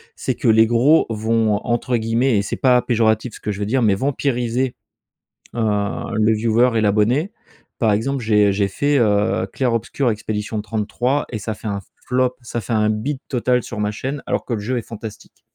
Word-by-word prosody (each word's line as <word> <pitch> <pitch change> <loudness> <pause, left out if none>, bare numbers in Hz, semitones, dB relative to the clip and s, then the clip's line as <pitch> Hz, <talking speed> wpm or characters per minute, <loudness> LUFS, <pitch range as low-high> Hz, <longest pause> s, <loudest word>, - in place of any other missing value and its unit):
C'est - - -2
que 135 - -2
les 110 0 +6
gros 125 +8 +4
vont, 110 -1 +1
entre 120 +1 0
guillemets 115 +1 +1
et - - +2
c'est 100 - -3
pas 125 -2 +4
péjoratif 110 -1 +1
ce - - -11
que 105 - -2
je 100 - -6
vais 105 - -1
dire, 125 +5 +1
heu, - - +3
mais, 100 -2 +4
«vampiriser» 125 0 -1 0.8
heu, - - -1 0.5
le 110 +1 +3
viewer 115 +3 +3
et - - +3
l'abonné. 110 - +2 0.5
Par 110 -3 +2
exemple 130 +6 -1
j'ai 105 -2 +4
j'ai 100 0 +1
fait, 145 +8 +1
heu, 105 -1 +2
Clair 125 -3 0
Obscur: 120 +3 0
expédition 105 0 -3
33, 120 +6 -1
et 110 - -3
ça 110 +1 -4
a - - -4
fait 110 - -7
un 100 -1 -2 0.3
flop, 125 0 +1
ça 120 0 -5
a - - 0
fait 110 - -5
un 105 0 +2
bide 130 +6 -2
total 125 -1 +1
sur - - -7
ma 105 0 0
chaîne 135 +6 -4
alors - - -1
que 120 - -3
le 110 - -3
jeu 120 +5 -2
est - - -4
fantastique. 110 0 -10
115 Hz, 210 wpm, -20 LUFS, 105-125 Hz, 0.8 s, les